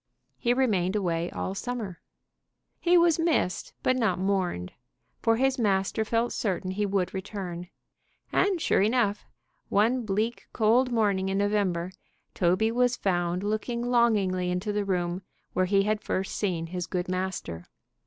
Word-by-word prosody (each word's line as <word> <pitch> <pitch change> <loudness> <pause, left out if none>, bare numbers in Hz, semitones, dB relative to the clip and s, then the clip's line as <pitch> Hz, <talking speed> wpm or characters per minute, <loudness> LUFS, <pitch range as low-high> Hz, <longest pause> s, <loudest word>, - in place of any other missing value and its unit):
He 240 - +1
remained 205 -8 +1
away 170 -4 0
all 190 - -4
summer. 215 -4 -5 0.8
He 355 0 +4
was 340 -2 +4
missed 320 - 0
but 255 - +3
not 225 -8 +1
mourned, 185 - -1 0.5
for 225 -1 +3
his 265 +1 +1
master 200 0 +1
felt 230 +2 0
certain 185 -3 -2
he 205 +2 -1
would 195 -2 0
return; 190 -3 -5 0.6
and, 385 -2 +2
sure 315 - +2
enough, 210 -1 +1 0.4
one 235 +5 +2
bleak 215 +3 -2
cold 245 +3 +3
morning 200 -5 +1
in 195 - 0
November, 200 -4 0 0.4
Toby 185 +5 +2
was 245 +1 +2
found 175 -1 0
looking 235 +3 -2
longingly 200 -7 +2
into 180 +4 -1
the 205 -1 0
room 180 -1 -1 0.3
where 185 - +2
he 195 +1 +3
had 215 +1 0
first 190 -2 -2
seen 175 -5 -1
his 175 +1 -4
good 180 -1 -2
master. 185 - -3
200 Hz, 145 wpm, -27 LUFS, 185-230 Hz, 0.8 s, He